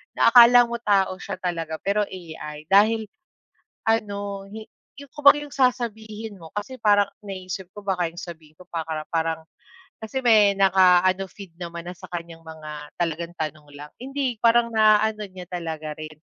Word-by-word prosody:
na 230 Hz, -, +4 dB
akala 245 Hz, 0 st, +9 dB
mo 235 Hz, 0 st, -4 dB
tao 195 Hz, -4 st, +1 dB
siya 200 Hz, -, -5 dB
talaga 165 Hz, -3 st, -3 dB
pero 205 Hz, +1 st, +1 dB
AI 160 Hz, -4 st, -9 dB
dahil 215 Hz, +1 st, +4 dB, 0.8 s
ano, 200 Hz, -2 st, -2 dB
hi 220 Hz, 0 st, -9 dB, 0.3 s
yung 285 Hz, -, -13 dB
kumbaga 295 Hz, +1 st, +5 dB
yung 290 Hz, -1 st, -10 dB
sasabihin 220 Hz, -5 st, -1 dB
mo 160 Hz, -2 st, -13 dB
kasi 210 Hz, +5 st, -5 dB
parang 205 Hz, -2 st, +3 dB, 0.2 s
naiisip 190 Hz, -1 st, -6 dB
ko 205 Hz, -, -9 dB
baka 180 Hz, -4 st, -1 dB
yung 175 Hz, -, -10 dB
sabihin 160 Hz, -3 st, -11 dB
ko 180 Hz, -, -15 dB
paka 160 Hz, -2 st, -4 dB
parang 165 Hz, -1 st, -1 dB, 0.6 s
kasi 220 Hz, +5 st, -4 dB
may 210 Hz, -4 st, +5 dB
na 195 Hz, -1 st, +4 dB
ka 185 Hz, -1 st, +6 dB
ano, 190 Hz, +1 st, 0 dB
feed 195 Hz, -5 st, -12 dB
naman 170 Hz, 0 st, -7 dB
na 180 Hz, -, -6 dB
sa -, -, -13 dB
kanyang 170 Hz, -1 st, -7 dB
mga 155 Hz, -2 st, -9 dB
talagang 170 Hz, 0 st, -2 dB
tanong 155 Hz, -1 st, -5 dB
lang. 150 Hz, +1 st, -10 dB
Hindi 265 Hz, -2 st, -3 dB
parang 235 Hz, 0 st, +3 dB
naano 215 Hz, 0 st, +4 dB
niya 180 Hz, -1 st, -10 dB
talaga 160 Hz, -4 st, -5 dB
rin. 155 Hz, 0 st, -8 dB
195 Hz, 170 wpm, -24 LUFS, 165-220 Hz, 0.8 s, akala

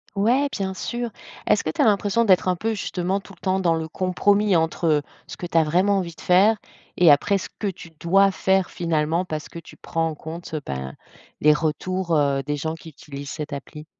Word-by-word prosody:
Ouais, 240 Hz, +8 st, +3 dB
bien 190 Hz, -2 st, -3 dB
sûr. 240 Hz, +4 st, -3 dB, 0.4 s
Est-ce -, -, +3 dB
que 155 Hz, -, -1 dB
tu -, -, -1 dB
as -, -, +5 dB
l'impression 210 Hz, +1 st, +2 dB
d'être 190 Hz, -3 st, +4 dB
un 180 Hz, -, +2 dB
peu 220 Hz, +5 st, -2 dB
justement 190 Hz, -1 st, -2 dB
tout 195 Hz, -, -14 dB
le -, -, -29 dB
temps 190 Hz, 0 st, +1 dB
dans 170 Hz, -3 st, +2 dB
le 160 Hz, -1 st, -2 dB
compromis 200 Hz, +3 st, +2 dB
entre, 165 Hz, +1 st, 0 dB
heu, 155 Hz, -2 st, +3 dB, 0.2 s
ce -, -, -10 dB
que 175 Hz, -, -5 dB
tu 170 Hz, -, -1 dB
as 165 Hz, -, +6 dB
vraiment 185 Hz, +6 st, +2 dB
envie 175 Hz, -3 st, -3 dB
de -, -, -14 dB
faire 195 Hz, +5 st, +5 dB, 0.4 s
et 175 Hz, -2 st, +6 dB
après 200 Hz, +8 st, +3 dB
ce -, -, -7 dB
que -, -, -5 dB
tu 185 Hz, -4 st, -5 dB
dois 195 Hz, +3 st, +4 dB
faire, 190 Hz, -1 st, +1 dB
finalement, 165 Hz, +1 st, 0 dB
parce 155 Hz, -3 st, -5 dB
que -, -, -10 dB
tu 165 Hz, -, -11 dB
prends 165 Hz, 0 st, -2 dB
en -, -, -5 dB
compte, 160 Hz, +3 st, -8 dB
ben, 65 Hz, 0 st, -5 dB, 0.5 s
les 150 Hz, -, +6 dB
retours, 170 Hz, +3 st, -1 dB
heu, 140 Hz, -2 st, +2 dB
des 145 Hz, +1 st, -2 dB
gens 160 Hz, +2 st, -3 dB
qui 165 Hz, 0 st, -12 dB
utilisent 140 Hz, -2 st, -9 dB
cette 150 Hz, -2 st, -5 dB
appli? 150 Hz, +2 st, -8 dB
175 Hz, 225 wpm, -23 LUFS, 155-195 Hz, 0.5 s, as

